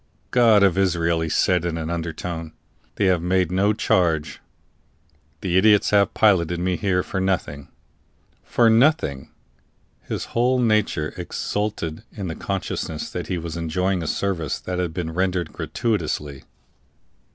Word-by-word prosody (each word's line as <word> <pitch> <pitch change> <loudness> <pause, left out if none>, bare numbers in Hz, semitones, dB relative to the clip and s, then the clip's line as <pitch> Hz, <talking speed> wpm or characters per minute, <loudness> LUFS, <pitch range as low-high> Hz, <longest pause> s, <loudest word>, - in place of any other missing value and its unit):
"God 115 -5 +5
of 95 -1 +3
Israel!" 85 -3 +1
he 80 - -2
said 90 +2 +2
in 85 -1 -2
an 80 0 -4
undertone, 80 -1 -5 0.4
"they 100 - +1
have 90 -3 +3
made 90 0 +1
no 100 +3 +2
charge; 85 -7 0 1.0
the 90 -2 +1
idiots 105 0 +4
have 100 -2 +3
piloted 90 -5 +3
me 90 +1 0
here 90 -1 0
for 95 - -4
nothing." 80 -7 -2 0.8
For 120 - +2
nothing! 115 - +2 0.7
His - - -4
whole 125 +2 +2
nature 110 -10 +1
exulted 105 -6 -3
in 95 -5 -5
the 80 - -4
consciousness 75 0 -4
that - - -5
he 90 - -2
was 85 -1 -5
enjoying 90 +3 -1
a 80 - -4
service 85 -6 -1
that 90 0 -4
had 90 -2 -1
been 80 0 -4
rendered 90 0 -1
gratuitously. 75 - -3
90 Hz, 140 wpm, -23 LUFS, 80-100 Hz, 1.0 s, God